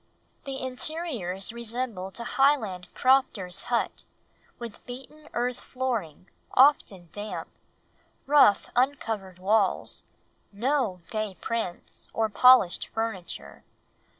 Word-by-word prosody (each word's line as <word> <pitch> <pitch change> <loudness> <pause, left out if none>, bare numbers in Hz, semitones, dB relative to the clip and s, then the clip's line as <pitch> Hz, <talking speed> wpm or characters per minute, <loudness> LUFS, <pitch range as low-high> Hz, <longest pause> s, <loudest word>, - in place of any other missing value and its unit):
The 270 -1 -4
interiors 255 - -2
resembled 235 -4 -4
a - - -4
Highland 235 -9 +2
crofter's 255 -9 +2
hut, - - -1 0.5
with 235 -3 -9
beaten 270 +5 -10
earth 245 +1 -1
flooring, 230 - -3 0.3
often 210 - +4
damp; 210 +2 -6 0.8
rough 275 -8 +5
uncovered 225 -8 0
walls, 200 +1 +1 0.5
no 225 -3 0
gay 215 -3 -2
prints, 225 -7 -4
or 220 -1 +1
polished 250 -4 +5
furniture. 225 -6 -5
230 Hz, 95 wpm, -27 LUFS, 195-260 Hz, 0.8 s, rough